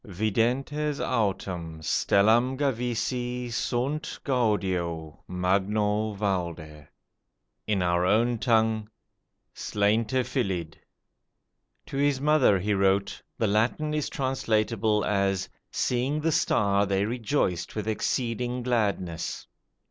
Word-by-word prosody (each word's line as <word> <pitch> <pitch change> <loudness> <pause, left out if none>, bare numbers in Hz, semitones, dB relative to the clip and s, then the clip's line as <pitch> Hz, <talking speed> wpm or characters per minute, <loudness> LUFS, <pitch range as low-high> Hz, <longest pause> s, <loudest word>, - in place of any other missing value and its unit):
Videntes 120 - 0
autem 95 -8 -2
stellam 115 +10 +3
gavisi 125 -2 -2
sunt 130 +6 -2
gaudio 95 - -1
magno 105 +4 0
valde. 85 -7 -3 0.8
In 100 -4 +1
our 85 0 +2
own 115 +5 +2
tongue, 110 -2 +2 0.6
'slainte 110 +5 +1
filidh'." 95 - -2 1.1
To 135 - -6
his 140 -1 +2
mother 145 -8 +4
he 105 +3 0
wrote, 100 0 +1 0.2
"the 115 - +1
Latin 115 +9 +1
is 150 -1 -1
translatable 110 -5 0
as, 100 -2 0 0.2
'seeing 130 +4 0
the 165 +1 +1
star 100 -7 +2
they 100 0 +1
rejoiced 110 - -1
with 105 -1 -3
exceeding 120 +2 -1
gladness'." 100 -8 -1
110 Hz, 95 wpm, -27 LUFS, 95-125 Hz, 1.1 s, mother